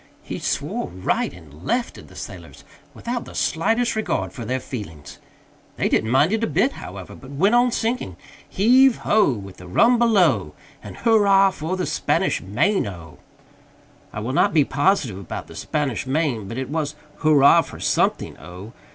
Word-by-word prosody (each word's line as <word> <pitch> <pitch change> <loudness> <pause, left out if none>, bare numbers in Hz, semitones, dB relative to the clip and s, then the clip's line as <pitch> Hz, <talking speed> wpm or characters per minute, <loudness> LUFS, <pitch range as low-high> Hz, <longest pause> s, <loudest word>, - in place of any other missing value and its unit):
He - - -6
swore - - -2
right 90 +1 -2
and 80 -3 -15
left 240 - -1
at - - -13
the - - -17
sailors - - -10 0.3
without 240 0 -4
the - - -12
slightest 225 +9 0
regard 215 -6 -2
for 120 - -7
their 130 +3 -1
feelings. 100 - -8 0.6
They - - 0
didn't 110 - +1
mind 145 - +3
it 225 0 0
a - - +2
bit, 265 - +1
however, 95 - -9
but 130 - -13
went 180 +10 +1
on 245 +1 +4
singing 225 - -2 0.3
"Heave 250 +5 +4
ho! 210 -8 +4
With 100 -5 -7
the 90 - -12
rum 230 - +4
below, 165 - +2 0.3
And - - -10
hurrah 200 -4 +4
for 180 +1 -4
the 185 - -1
Spanish - - 0
Main 120 - 0
O!" 85 -5 -10 0.9
I 105 - -5
will 125 +4 -3
not 155 - +2
be 150 -3 +5
positive 140 - +1
about 95 - -6
"the - - -13
Spanish 140 -5 -2
Main," 130 -7 -1
but 115 - -6
it 130 -1 -4
was 150 -1 -2 0.2
hurrah 155 +1 +5
for - - -10
something - - 0
O. 90 +6 -11
150 Hz, 175 wpm, -22 LUFS, -, 0.9 s, be